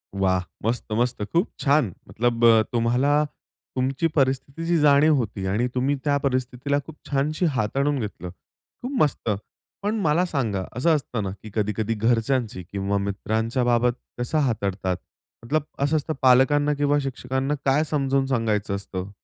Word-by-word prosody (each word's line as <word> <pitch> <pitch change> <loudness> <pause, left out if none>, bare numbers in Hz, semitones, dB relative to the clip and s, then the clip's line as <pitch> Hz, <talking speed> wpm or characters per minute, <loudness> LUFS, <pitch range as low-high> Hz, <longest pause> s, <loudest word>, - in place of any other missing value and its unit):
वाह! 95 -1 +2 0.2
मस्त, 120 +2 0
मस्त, 120 0 0
खूप 170 - 0
छान! 140 - +2 0.2
मतलब 120 0 0
अ, 115 -1 +7
तुम्हाला 125 +6 +2 0.5
तुमची 135 +5 +1
परिस्थितीची 140 +5 +1
जाणीव 150 +1 +5
होती 105 -6 -2
आणि 105 +6 +1
तुम्ही 135 +3 +1
त्या 145 -1 +3
परिस्थितीला 130 +1 0
खूप 160 - -10
छानशी 150 +5 0
हाताळून 135 +6 0
घेतलं. 100 -5 -5 0.5
खूप 250 - -4
मस्त. 145 -5 +1 0.5
पण 215 +2 0
मला 170 0 +2
सांगा, 115 - -1
असं 160 +4 +3
असतं 125 -6 -3
ना, 95 - -2
की 110 - -8
कधी-कधी 105 +1 0
घरच्यांची 115 -2 0
किंवा 100 0 -1
मित्रांच्या 110 +5 -1
बाबत 120 0 +3 0.3
कसं 125 +6 -1
हाताळतात? 100 -5 -1 0.5
मतलब, 155 +3 0 0.2
असं 145 +3 +2
असतं, 155 +1 -2
पालकांना 135 +3 +4
किंवा 145 0 +2
शिक्षकांना 130 +1 -2
काय 140 +3 +3
समजून 135 -2 +1
सांगायचं 110 -5 0
असतं? 100 -1 -5
125 Hz, 145 wpm, -24 LUFS, 110-145 Hz, 0.5 s, अ